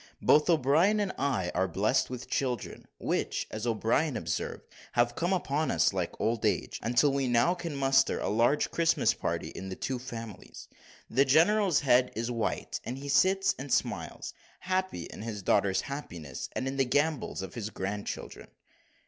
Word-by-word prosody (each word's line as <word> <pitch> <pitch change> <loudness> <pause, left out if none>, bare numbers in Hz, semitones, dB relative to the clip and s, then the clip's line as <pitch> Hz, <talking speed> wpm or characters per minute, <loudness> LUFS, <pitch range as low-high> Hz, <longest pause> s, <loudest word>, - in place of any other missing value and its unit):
Both 150 +3 +5
O'Brien 165 +7 +4
and 200 -2 0
I 125 -11 0
are 95 +1 +1
blessed 105 +9 +1
with 125 0 -6
children, 125 -3 -3
which, - - -1
as 110 +2 -4
O'Brien 115 +5 +1
observed, - - -3 0.3
have 120 0 +2
come 175 +2 -1
upon 155 -4 0
us - - +2
like 90 -3 -3
old 115 0 0
age, - - 0
until 125 +4 +3
we 135 -1 0
now 120 +8 +3
can 170 -4 -5
muster 135 -1 +3
a - - -2
large 120 +7 +2
Christmas 170 0 +2
party - - -3
in 95 - -7
the 95 - -5
two 130 +4 -3
families. 115 -4 -9 0.4
The 130 +4 +3
general's 170 +6 +4
head 125 -2 +4
is 115 +3 -2
white, 115 -2 -2
and 125 +2 -5
he 140 +1 -7
sits 190 +6 +3
and 135 0 -6
smiles, - - -2 0.3
happy 185 - -1
in - - -9
his 105 -3 -5
daughter's 100 0 +2
happiness, 90 - -6
and 130 - -2
in 135 +1 -3
the 135 - +3
gambols 145 -5 0
of 95 - -7
his 110 -3 -4
grandchildren. 100 0 -5
130 Hz, 170 wpm, -29 LUFS, 110-150 Hz, 0.4 s, Both